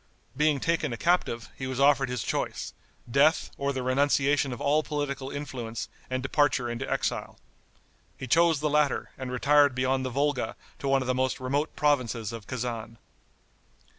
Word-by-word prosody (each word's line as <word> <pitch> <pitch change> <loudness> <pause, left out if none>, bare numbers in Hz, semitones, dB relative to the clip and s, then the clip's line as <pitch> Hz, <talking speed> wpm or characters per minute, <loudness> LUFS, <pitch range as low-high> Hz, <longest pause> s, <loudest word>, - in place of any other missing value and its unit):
Being 150 0 +2
taken 165 -2 0
a 115 - -4
captive, 165 -9 0
he 130 - -5
was 130 0 -4
offered 140 -1 +4
his 125 -3 -2
choice, - - -3 0.3
death, 140 +6 +3
or 140 0 -1
the 130 -2 -3
renunciation 140 +1 +2
of 120 - -5
all 150 +2 +2
political 140 -3 -3
influence 125 -6 -5 0.2
and 130 0 -2
departure 135 -3 +1
into 120 +3 -4
exile. - - -2 0.8
He - - -6
chose 165 +2 +3
the 155 - +1
latter, 150 -1 +1
and 130 -1 -6
retired 145 +1 +4
beyond 130 +1 +1
the 130 - -2
Volga 140 +1 -1 0.2
to 140 - -4
one 135 -1 +3
of - - -7
the 130 - +2
most 130 0 0
remote 140 +4 -1
provinces 125 -7 0
of 115 -3 -8
Kezan. 115 -2 -4
135 Hz, 165 wpm, -27 LUFS, 125-145 Hz, 0.8 s, offered